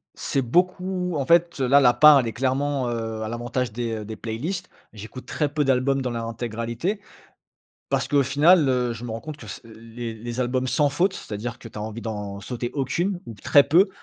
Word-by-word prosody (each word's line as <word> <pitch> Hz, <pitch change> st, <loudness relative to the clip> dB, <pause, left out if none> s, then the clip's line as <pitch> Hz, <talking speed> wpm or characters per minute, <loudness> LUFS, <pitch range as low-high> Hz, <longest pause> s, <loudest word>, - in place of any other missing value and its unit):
c'est 135 Hz, -, -1 dB
beaucoup, 180 Hz, +5 st, 0 dB
en 140 Hz, -, -1 dB
fait 170 Hz, 0 st, +3 dB
là, 135 Hz, +2 st, +5 dB
la 125 Hz, -3 st, +5 dB
part 150 Hz, -2 st, +8 dB
elle 120 Hz, -, -1 dB
est 115 Hz, -, -4 dB
clairement, 135 Hz, 0 st, 0 dB
heu, 115 Hz, -1 st, -3 dB
à 110 Hz, -, -3 dB
l'avantage 120 Hz, 0 st, -2 dB
des 115 Hz, -1 st, -3 dB
des 110 Hz, 0 st, -6 dB
playlists. 155 Hz, -, -4 dB, 0.2 s
J'écoute 115 Hz, +5 st, -10 dB
très 150 Hz, -, 0 dB
peu 150 Hz, -2 st, +1 dB
d'albums 135 Hz, +1 st, +2 dB
dans 125 Hz, -, -2 dB
leur 115 Hz, -1 st, -3 dB
intégralité, 115 Hz, -, -3 dB, 0.9 s
parce -, -, 0 dB
qu'au 140 Hz, -2 st, +3 dB
final, 150 Hz, +3 st, +5 dB
heu, 125 Hz, -2 st, +1 dB
je 115 Hz, +2 st, -8 dB
me 115 Hz, -, -5 dB
rends 115 Hz, -, -4 dB
compte 155 Hz, -1 st, -7 dB
que 115 Hz, -, -12 dB
c 90 Hz, -, -8 dB
les 115 Hz, +1 st, -8 dB
les 120 Hz, +2 st, -6 dB
albums 130 Hz, +1 st, 0 dB
sans 145 Hz, +4 st, +2 dB
faute. 180 Hz, +7 st, +1 dB
c'est-à-dire 115 Hz, -, -6 dB
que 115 Hz, -, -10 dB
tu 110 Hz, -, -11 dB
as -, -, -4 dB
envie 110 Hz, +2 st, -6 dB
d'en 105 Hz, -3 st, -5 dB
sauter 120 Hz, 0 st, -4 dB
aucune, 175 Hz, +7 st, -1 dB
ou 115 Hz, -, -6 dB
très 140 Hz, +7 st, +5 dB
peu. 175 Hz, +7 st, +4 dB
125 Hz, 210 wpm, -24 LUFS, 115-145 Hz, 0.9 s, part